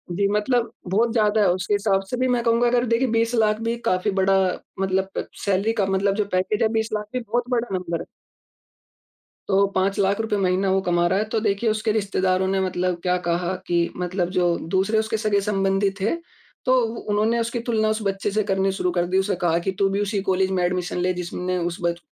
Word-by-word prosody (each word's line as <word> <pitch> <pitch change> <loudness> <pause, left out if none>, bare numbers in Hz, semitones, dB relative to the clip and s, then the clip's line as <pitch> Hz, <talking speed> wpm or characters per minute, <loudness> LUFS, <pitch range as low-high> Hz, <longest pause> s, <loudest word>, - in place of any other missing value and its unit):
जी, 200 +1 +2
मतलब 230 +3 +1 0.2
बहुत 225 +4 +2
ज़्यादा 215 -1 +3
है, 200 - +4
उसके 185 +3 -2
हिसाब 200 -1 +2
से 250 - -2
भी 255 0 +1
मैं 245 -2 +1
कहूँगा 235 +1 +3
अगर 245 0 +2
देखिए 235 +3 +2
20 230 +1 +1
लाख 215 -1 +2
भी 230 +1 -1
काफ़ी 185 +3 +1
बड़ा 195 +1 +3 0.5
मतलब 190 0 0
अ, - - +1 0.2
सैलरी 200 +3 +1
का 205 -4 +1
मतलब 195 +1 +1
जो 210 -1 0
पैकेज 185 +3 0
है - - +4
20 220 0 0
लाख 210 0 -2
भी 255 - 0
बहुत 240 +2 -2
बड़ा 240 -1 0
नंबर 170 -2 -3
है। - - -7 1.4
तो 200 0 +4
₹5 195 +1 +1
लाख 200 +2 +2
रुपए 215 -2 -1
महीना 190 0 +1
वो 195 - +3
कमा 175 -1 +1
रहा 190 +3 +1
है 215 - 0
तो 220 - +2
देखिए, 210 +1 0
उसके 215 0 0
रिश्तेदारों 190 -3 0
ने 190 0 +1
मतलब 180 -1 -1
क्या 180 0 +2
कहा 175 +2 0
कि 170 -1 +1
मतलब 180 0 -1
जो 175 -1 +2 0.2
दूसरे 195 +4 +2
उसके 220 0 -1
सगे-संबंधी 200 -2 +1
थे, 215 - 0 0.5
तो 255 - +4
उ 225 0 -2
उन्होंने 215 +3 +2
उसकी 235 +1 -2
तुलना 225 -2 0
उस 215 0 -1
बच्चे 195 0 -1
से 215 +1 +1
करनी 195 0 +1
शुरू 180 -2 -1
कर 175 0 0
दी, 185 - +1
उसे 190 0 +1
कहा 170 0 +2
कि, 190 +2 -2
"तू 195 +1 +1
भी 200 +1 -1
उसी 205 0 -1
कॉलेज 190 -1 +1
में 180 -1 0
एडमिशन 180 0 -1
ले, 180 +1 +1
जिसने 180 +1 -3
उस 170 0 -2
बच 170 0 -1
195 Hz, 220 wpm, -23 LUFS, 185-220 Hz, 1.4 s, है